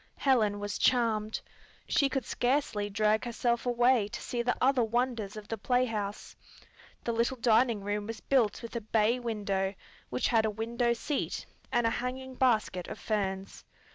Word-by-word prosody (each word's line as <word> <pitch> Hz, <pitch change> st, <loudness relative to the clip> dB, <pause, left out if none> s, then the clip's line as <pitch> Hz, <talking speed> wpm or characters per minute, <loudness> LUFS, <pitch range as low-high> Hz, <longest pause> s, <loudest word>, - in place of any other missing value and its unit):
Helen 220 Hz, -7 st, +2 dB
was 205 Hz, 0 st, -4 dB
charmed. 220 Hz, -3 st, +2 dB, 0.5 s
She 280 Hz, -, +3 dB
could 265 Hz, -4 st, -2 dB
scarcely 245 Hz, -5 st, 0 dB
drag 215 Hz, +1 st, +2 dB
herself 240 Hz, 0 st, -1 dB
away 240 Hz, -2 st, +3 dB
to -, -, -6 dB
see 240 Hz, -, -3 dB
the 245 Hz, +1 st, +1 dB
other 260 Hz, -1 st, +3 dB
wonders 230 Hz, -3 st, -1 dB
of 210 Hz, -1 st, -8 dB
the 225 Hz, -1 st, -4 dB
playhouse. 225 Hz, -4 st, -1 dB, 0.7 s
The 235 Hz, -, -1 dB
little 235 Hz, +3 st, 0 dB
dining 230 Hz, -2 st, +3 dB
room 205 Hz, +1 st, -2 dB
was 225 Hz, -1 st, -5 dB
built 245 Hz, -5 st, +1 dB
with 230 Hz, -, -8 dB
a 235 Hz, -, -1 dB
bay 220 Hz, +3 st, +2 dB
window, 200 Hz, -4 st, -1 dB, 0.3 s
which 125 Hz, -, 0 dB
had 225 Hz, -2 st, +4 dB
a 220 Hz, -, +1 dB
window 235 Hz, +3 st, 0 dB
seat, 275 Hz, +5 st, -3 dB, 0.3 s
and 240 Hz, -, +2 dB
a 230 Hz, -, +3 dB
hanging 260 Hz, +2 st, -4 dB
basket 220 Hz, -8 st, +1 dB
of -, -, -6 dB
ferns. 195 Hz, -3 st, -3 dB
230 Hz, 165 wpm, -30 LUFS, 210-245 Hz, 0.7 s, had